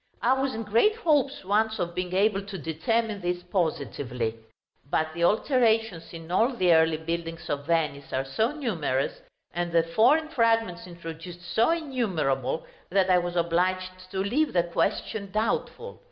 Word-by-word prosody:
I 250 - +5
was 265 -2 -1
in 225 - -3
great 230 - +3
hopes 295 - +1
once 220 +3 +1
of 175 -3 -2
being 180 0 -3
able 200 0 +3
to 200 0 -7
determine 200 +8 -1
this 175 0 -2
positively; 140 - -2 0.5
but 160 +1 0
the 170 0 -2
alterations 225 - +2
in 165 0 -9
all 230 +8 +2
the 180 -6 +4
early 160 -1 +4
buildings 165 +1 -4
of 145 0 -3
Venice 150 -4 0
are 130 +1 -1
so 220 - 0
numerous, 175 - -2 0.3
and 175 0 -2
the 165 -1 +4
foreign 245 - +3
fragments 225 - +1
introduced 170 0 -9
so 225 +5 +4
innumerable, 185 - -1 0.2
that 190 0 +2
I 180 - +6
was 175 0 -4
obliged 185 +2 0
to 190 0 -2
leave 280 +10 +1
the 175 -2 +3
question 195 +4 -1
doubtful. 225 - -2
185 Hz, 155 wpm, -27 LUFS, 165-225 Hz, 0.5 s, I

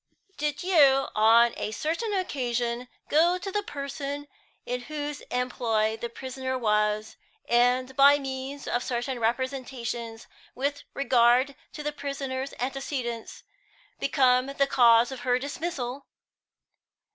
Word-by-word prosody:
"Did 295 +2 -2
you 280 -7 +5
on 230 +2 +5
a - - -2
certain 325 - -2
occasion 245 - -2 0.2
go 340 +4 +4
to 385 +2 -6
the 415 - 0
person 285 -3 -5 0.4
in 250 0 -3
whose 295 +1 -5
employ 230 -3 0
the 235 +1 -5
prisoner 260 +2 -4
was, 210 -2 0 0.3
and, 250 +2 +2
by 280 +1 +7
means 270 0 -6
of 240 - 0
certain 245 +1 -2
representations 240 -1 -3 0.3
with 285 +2 -2
regard 255 0 +3 0.2
to 300 - -7
the 295 - -1
prisoner's 275 -2 -4
antecedents, 255 -3 -4 0.6
become 255 -2 +3
the 275 0 +1
cause 240 -2 +5
of 265 - -6
her 250 -1 +1
dismissal?" 280 -2 -4
260 Hz, 120 wpm, -27 LUFS, 240-285 Hz, 0.6 s, by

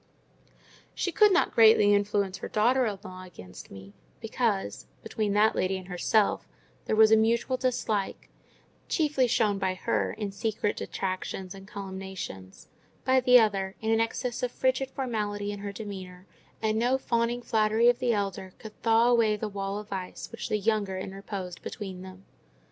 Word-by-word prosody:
She 360 - -1
could 420 +4 +5
not 350 - +2
greatly 220 -2 +6
influence 200 -1 0
her - - -5
daughter 245 +4 +2
in 205 -2 -3
law 185 -1 -9
against 90 - -12
me, 95 0 -12 0.3
because, 95 -8 -2 0.2
between 210 -2 -2
that 210 +2 +3
lady 190 +1 0
and 185 0 -10
herself 200 +3 +1 0.4
there - - 0
was 220 0 +6
a - - +8
mutual 230 +3 +2
dislike—chiefly 255 - -2
shown 215 -4 +1
by 190 -1 0
her - - -1
in 210 -2 -4
secret 210 0 -2
detractions 185 0 -4
and 195 0 -12
calumniations; 190 - -7 0.4
by 260 0 +4
the 250 -1 +7
other, 195 -3 0
in 220 0 -1
an 225 - +3
excess 240 +2 -2
of 250 -1 -1
frigid 260 +1 0
formality 210 -6 -3
in 205 - -6
her 200 0 -5
demeanour; 190 -3 -8 0.4
and 220 0 +1
no 250 +3 +2
fawning 240 -1 -1
flattery 220 0 +2
of 245 0 +4
the 250 -1 +1
elder 195 -3 -3
could 220 -1 -11
thaw 225 +1 +4
away 230 -3 +3
the 215 +1 -4
wall 195 -1 -4
of 210 0 -7
ice 185 -1 -6
which - - -6
the 215 - +1
younger 205 -2 0
interposed 190 -1 -6
between 190 -3 -7
them. 185 0 -12
210 Hz, 165 wpm, -28 LUFS, 190-230 Hz, 0.4 s, a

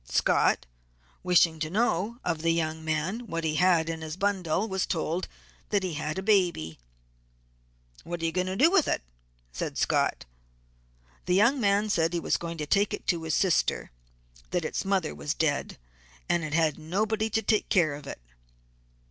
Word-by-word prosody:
Scott, - - +2 0.6
wishing 170 -3 +3
to 155 0 -2
know 210 +2 0
of 165 -3 -1
the 165 - +1
young 160 -1 -1
man 165 +10 -2
what 165 -3 -3
he 155 -1 0
had 175 -2 +3
in 165 -1 -4
his 160 +1 -6
bundle, 195 -1 0
was 190 -3 -1
told 165 +2 -2 0.4
that 200 -2 +1
he 180 -3 -2
had 155 +2 -3
a 190 - -3
baby. 175 - +1 1.2
'What 175 0 -5
are 165 - -2
you 165 - +1
going 180 +2 -1
to 185 - -2
do 310 - +5
with 375 -6 +4
it?' - - 0 0.5
said - - -4
Scott. - - +1 1.0
The 180 - +3
young 235 +8 +4
man 205 0 +2
said 165 -5 +2
that 165 +2 -1
he - - +1
was - - 0
going 170 -1 -6
to 150 - -3
take 200 +7 +2
it - - -15
to 170 -3 +1
his 160 -1 -1
sister; 185 - +1 0.6
that 175 -3 -1
its - - -2
mother 190 -5 0
was 150 - -3
dead, 145 -3 -1 0.5
and 170 - +1
it 155 0 -3
had 160 -2 +2
nobody 215 +7 -1
to 220 +1 0
take 215 +1 +1
care 170 -6 +3
of 145 +1 -9
it. - - -7
170 Hz, 185 wpm, -27 LUFS, 160-200 Hz, 1.2 s, do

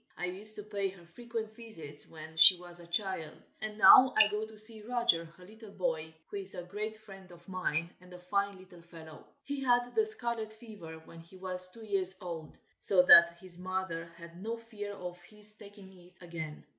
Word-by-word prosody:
I 180 - -3
used 200 +4 +6
to 210 - -7
pay 200 -2 -3
her 185 -2 -12
frequent 225 +3 -7
visits 160 -11 -12
when 160 0 -12
she 160 +3 +9
was 175 0 -13
a 170 - -14
child, 170 -3 -3 0.2
and 215 -1 -6
now 255 +4 +8
I 210 - +6
go 210 +1 -3
to 220 0 -15
see 215 +1 -1
Roger, 235 -7 0
her 175 +3 -17
little 220 +2 -14
boy, 165 -5 -4
who 205 - -8
is 195 -1 -9
a 180 - -6
great 210 +4 -6
friend 195 -4 -14
of 175 0 -17
mine, 175 -3 -2
and 180 0 -17
a 180 - -10
fine 200 +2 -2
little 180 -2 -16
fellow. 165 -2 -14 0.2
He 280 0 -5
had 245 -1 +1
the 440 -1 +1
scarlet 235 - -4
fever 210 -8 -11
when 165 - -14
he 170 +3 -16
was 185 -1 +1
two 220 +4 -13
years 190 -2 -2
old, 165 -4 -8 0.2
so 185 -3 +5
that 170 -1 +8
his 180 -1 -12
mother 185 -2 -4
had 170 +1 -13
no 225 +3 -4
fear 215 -3 -8
of 180 -1 -8
his 210 +3 -10
taking 200 -2 -15
it 180 0 -19
again. 160 -4 -8
190 Hz, 205 wpm, -31 LUFS, 170-215 Hz, 0.2 s, she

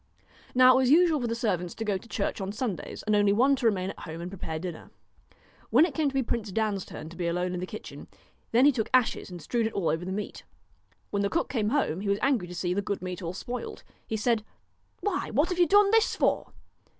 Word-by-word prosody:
Now 255 0 +8
it - - +4
was 260 -1 +3
usual 320 -1 +5
for 240 - -1
the 230 - -1
servants 185 -7 -1
to 225 - -4
go 205 -2 +1
to 230 - -16
church - - -2
on 190 +1 -3
Sundays, 215 -3 -4
and 215 - 0
one 210 - +4 0.3
only - - +5
to 245 - -3
remain 190 -3 0
at - - -13
home 160 0 -7
and 175 +2 -6
prepare 165 -4 -5
dinner. 170 0 -7 0.8
When 320 - +6
it 335 - -4
came 295 0 +1
to 270 -1 0
Prince 225 -3 -3
Dan's 210 -2 -1
turn 155 - -8
to 170 - -12
be 175 -1 -2
alone 180 +1 -1
in 180 - -3
the 180 - -4
kitchen, 215 - -9 0.4
then 245 +4 +5
he 290 - +7
took 230 -5 -2
ashes 250 -5 +1
and 180 -1 -8
strewed 225 +8 0
it 225 - -6
over 195 - -2
all - - +2
the 175 - -7
meat. 205 +2 -5 0.7
When 200 - 0
the 200 - +1
cook 335 - -1
came 215 -5 0
home 225 - 0
he 200 - -2
was 200 - +2
angry 250 -10 +2
to 180 - -8
see 175 +1 -1
the 200 - 0
good 200 -1 -3
meat 185 +1 -5
all 170 0 -4
spoiled. 240 +5 -6 0.2
He 220 - -2
said: 225 0 +1 0.3
' - - -42
Why, 410 -3 -1
what 295 - +1
have 360 -1 -2
you 350 - +5
done 405 +3 +5
this 450 0 +3
for - - +1
215 Hz, 255 wpm, -28 LUFS, 185-255 Hz, 0.8 s, Now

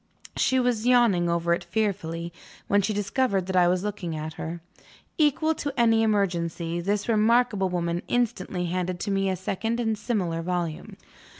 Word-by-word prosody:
She 260 - +2
was 245 -2 0
yawning 230 -9 +4
over 170 0 +1
it 170 - -2
fearfully, 170 -6 -2 0.3
when 205 0 +3
she 200 +3 -1
discovered 205 -1 0
that 190 0 -3
I 180 -1 +5
was 180 +1 +1
looking 195 -6 -4
at 155 +1 -5
her. 165 +2 -6 0.6
Equal 310 +1 +3
to 290 -2 -4
any 225 -1 +4
emergency, 175 -5 0
this 200 +3 -1
remarkable 220 -3 +3
woman 170 -1 -1
instantly 210 -7 -1
handed 180 0 -2
to 200 - -2
me 195 0 +1
a 190 - 0
second 220 +6 -2
and 225 -2 0
similar 200 -7 -2
volume. 175 -2 -3
195 Hz, 165 wpm, -26 LUFS, 175-225 Hz, 0.6 s, I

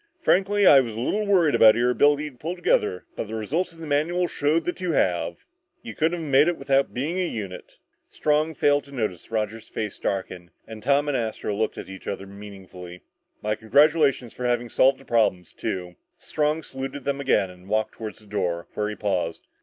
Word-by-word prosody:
"Frankly, 200 - +2
I 140 - +9
was 115 -4 -2
a - - -5
little 210 - -1
worried 175 -7 +4
about 110 -1 +7
your 120 +1 +2
ability 145 +3 +2
to - - -22
pull 165 +8 -5
together 105 - 0
but - - -4
the 110 - -5
results 145 - -2
of 165 - -18
the 165 - -8
manuals 165 +5 0
showed 155 +2 +1
that 175 - -3
you 180 -3 -1
have. 90 -10 0 0.4
You 110 - -7
couldn't 165 +5 0
have 160 - -5
made 140 +2 +5
it 175 - 0
without 135 0 +2
working 155 +9 -3
as 180 - 0
a - - -7
unit." 100 -5 -7 0.3
Strong 155 +1 0
failed 145 0 +3
to 140 - -16
notice 110 -10 -4
Roger's 110 0 -3
face 105 -3 -4
darken, 90 -2 -3 0.2
and 110 -1 -9
Tom 145 +3 +2
and 145 - 0
Astro 110 -3 -2
look 110 +1 -1
at - - -7
each 95 0 -10
other 100 0 -4
meaningfully. 95 -3 -11 0.4
"My 105 0 0
congratulations 140 +2 +3
for 125 - -5
having 120 0 0
solved 135 +3 +4
that 135 - -17
problem 105 -6 +2
too!" 90 +1 -5 0.2
Strong 155 +1 -1
saluted 135 +1 -6
them 140 0 -2
again 100 -8 +2
and 90 +1 -16
walked 110 +1 0
toward 110 -2 -7
the 110 - -15
door, 90 -4 -2
where 105 0 -1
he 105 - -5
paused. 90 -6 -2
125 Hz, 210 wpm, -24 LUFS, 105-150 Hz, 0.4 s, I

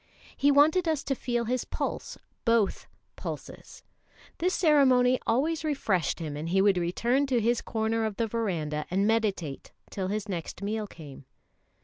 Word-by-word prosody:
He 285 - +3
wanted 310 +5 +4
us 315 -3 0
to 275 - -1
feel 240 -2 -2
his 250 +2 -1
pulse - - -4 0.3
both 230 -4 +1 0.3
pulses. - - -8 0.6
This 360 +2 +1
ceremony 260 -6 +4
always 300 +8 +1
refreshed 220 - 0
him, 155 -4 -5
and 155 +3 -4
he 190 +2 +2
would 195 -2 +4
return 240 +11 +1
to 255 -3 +2
his 235 +2 +1
corner 225 0 -1
of 215 -2 -3
the 230 - 0
verandah 175 -10 -2
and 195 +3 +1
meditate 205 -10 -1 0.2
till 190 -2 -3
his 210 +2 -3
next 180 0 -5
meal 215 +1 -2
came. 145 -7 -12
225 Hz, 155 wpm, -28 LUFS, 190-260 Hz, 0.6 s, wanted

